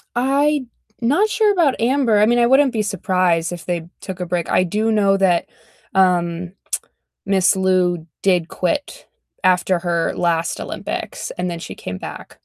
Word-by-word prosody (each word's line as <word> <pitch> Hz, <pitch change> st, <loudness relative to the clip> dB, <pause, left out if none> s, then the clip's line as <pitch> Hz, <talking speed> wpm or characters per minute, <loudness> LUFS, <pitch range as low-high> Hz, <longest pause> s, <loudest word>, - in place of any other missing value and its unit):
I 275 Hz, +2 st, +2 dB, 0.4 s
not 350 Hz, -, +2 dB
sure 430 Hz, -2 st, +3 dB
about 330 Hz, -9 st, +2 dB
Amber, 235 Hz, -3 st, +2 dB
I 210 Hz, -, +5 dB
mean, 240 Hz, +2 st, +3 dB
I 235 Hz, -, +4 dB
wouldn't 265 Hz, 0 st, +4 dB
be 220 Hz, -3 st, -1 dB
surprised 185 Hz, -4 st, 0 dB
if 175 Hz, -1 st, -7 dB
they 170 Hz, -1 st, -3 dB
took 190 Hz, -1 st, -7 dB
a 180 Hz, -, -2 dB
break. 175 Hz, -1 st, -2 dB
I 185 Hz, -, +3 dB
do 215 Hz, +5 st, 0 dB
know 200 Hz, -2 st, +3 dB
that, 180 Hz, -3 st, +2 dB, 0.5 s
um, 175 Hz, -1 st, +1 dB, 0.7 s
Miss 195 Hz, -2 st, +3 dB
Liu 185 Hz, -3 st, +1 dB, 0.2 s
did 180 Hz, -4 st, +2 dB
quit 290 Hz, -, -3 dB, 0.4 s
after 185 Hz, -1 st, +3 dB
her 170 Hz, -1 st, -1 dB
last 170 Hz, -1 st, 0 dB
Olympics, -, -, -5 dB
and 180 Hz, -, -2 dB
then 170 Hz, -, -4 dB
she -, -, -7 dB
came 90 Hz, 0 st, -6 dB
back. -, -, -9 dB
190 Hz, 165 wpm, -20 LUFS, 175-240 Hz, 0.7 s, I